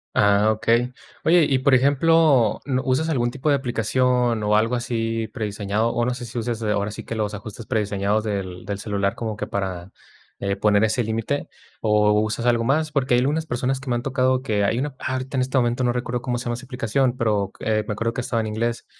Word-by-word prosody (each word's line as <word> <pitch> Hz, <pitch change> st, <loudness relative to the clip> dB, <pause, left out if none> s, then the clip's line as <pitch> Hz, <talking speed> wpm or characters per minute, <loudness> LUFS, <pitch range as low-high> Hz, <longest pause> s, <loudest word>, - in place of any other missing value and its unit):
Ah, 105 Hz, +1 st, +4 dB
okey. 115 Hz, +3 st, +1 dB, 0.3 s
Oye, 170 Hz, -1 st, +5 dB
y 135 Hz, -2 st, +2 dB
por 135 Hz, +1 st, +3 dB
ejemplo, 140 Hz, -2 st, +4 dB
¿n 130 Hz, -2 st, 0 dB
usas 130 Hz, +4 st, +1 dB
algún 120 Hz, -7 st, 0 dB
tipo 140 Hz, +3 st, -5 dB
de 145 Hz, -, +5 dB
aplicación, 125 Hz, -2 st, +1 dB
o 105 Hz, 0 st, +3 dB
algo 115 Hz, +3 st, +1 dB
así 115 Hz, -2 st, -2 dB
prediseñado? 105 Hz, 0 st, -2 dB
O 120 Hz, -, 0 dB
no 125 Hz, -, 0 dB
sé 125 Hz, 0 st, -6 dB
si 120 Hz, +1 st, -8 dB
uses, 115 Hz, 0 st, -2 dB
ahora 105 Hz, -1 st, 0 dB
sí 100 Hz, -, -8 dB
que, 115 Hz, -, -5 dB
los 105 Hz, -1 st, -2 dB
ajustes 105 Hz, +2 st, -8 dB
prediseñados 105 Hz, -2 st, 0 dB
del 95 Hz, -4 st, -4 dB
del 100 Hz, -, -3 dB
celular 100 Hz, -1 st, -1 dB
como 110 Hz, -3 st, -4 dB
que -, -, -4 dB
para, 95 Hz, -2 st, -4 dB, 0.5 s
eh, 100 Hz, 0 st, -1 dB
poner 105 Hz, 0 st, +3 dB
ese 110 Hz, +2 st, +1 dB
límite, 115 Hz, +6 st, -2 dB, 0.3 s
¿o 105 Hz, -1 st, +3 dB
usas 110 Hz, +2 st, -1 dB
algo 120 Hz, -1 st, +2 dB
más? 155 Hz, +4 st, +1 dB
Porque 135 Hz, -4 st, +1 dB
hay 120 Hz, -, +4 dB
algunas 150 Hz, +5 st, 0 dB
personas 130 Hz, -1 st, -1 dB
que 135 Hz, 0 st, -8 dB
me 120 Hz, -, +1 dB
han 120 Hz, -, -1 dB
tocado 130 Hz, -1 st, +1 dB
que 105 Hz, -6 st, 0 dB
hay 115 Hz, +4 st, +1 dB
una 145 Hz, +3 st, -1 dB
¡Ah! 130 Hz, -, -3 dB
Ahorita 130 Hz, +1 st, -3 dB
en -, -, +2 dB
este 130 Hz, +1 st, -1 dB
momento 120 Hz, 0 st, +1 dB
no 120 Hz, -, +2 dB
recuerdo 125 Hz, 0 st, -2 dB
cómo 125 Hz, -1 st, -2 dB
se 120 Hz, -, -5 dB
llama 120 Hz, 0 st, -1 dB
esa 125 Hz, -, -9 dB
aplicación, 125 Hz, 0 st, 0 dB
pero 105 Hz, -5 st, 0 dB
qu -, -, -12 dB
me 110 Hz, -1 st, 0 dB
acuerdo 115 Hz, +3 st, -1 dB
que -, -, -4 dB
estaba 120 Hz, -2 st, -1 dB
en 110 Hz, -, -3 dB
inglés, 115 Hz, +2 st, -2 dB
120 Hz, 225 wpm, -23 LUFS, 105-130 Hz, 0.5 s, Oye